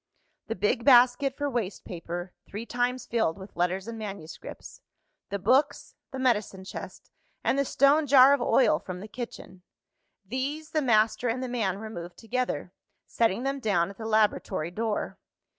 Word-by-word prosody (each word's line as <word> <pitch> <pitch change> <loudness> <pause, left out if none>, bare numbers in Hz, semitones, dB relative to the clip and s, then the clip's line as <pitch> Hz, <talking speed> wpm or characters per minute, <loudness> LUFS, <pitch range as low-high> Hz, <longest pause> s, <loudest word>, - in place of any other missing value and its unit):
The 225 - -2
big 210 +6 0
basket 255 +1 +5
for 290 - -1
waste 235 -7 -3
paper, 175 0 -6
three 210 +3 -6
times 245 +1 -1
filled 220 -7 0
with 190 +1 -11
letters 180 +3 -1
and 230 -1 -6
manuscripts; 195 -6 -8 0.5
the 200 - -2
books; 265 +9 +1 0.2
the 265 - -7
medicine 215 -7 0
chest; 190 - -9 0.3
and - - +2
the - - +3
stone 285 +4 +3
jar 270 0 +8
of 280 - +1
oil 260 - +3
from 180 -1 -7
the 205 - -8
kitchen 220 -5 -8 0.6
these, 275 +8 -4
the 310 - +1
master 225 -1 +2
and 250 +3 -2
the - - -2
man 220 -6 -1
removed 190 -5 -8
together; 250 +2 -3 0.3
setting 230 0 +1
them 275 +1 -1
down 195 -6 +1
at 200 - -15
the 220 - -5
laboratory 210 -6 +1
door. 215 +2 -3
225 Hz, 160 wpm, -27 LUFS, 195-255 Hz, 0.6 s, jar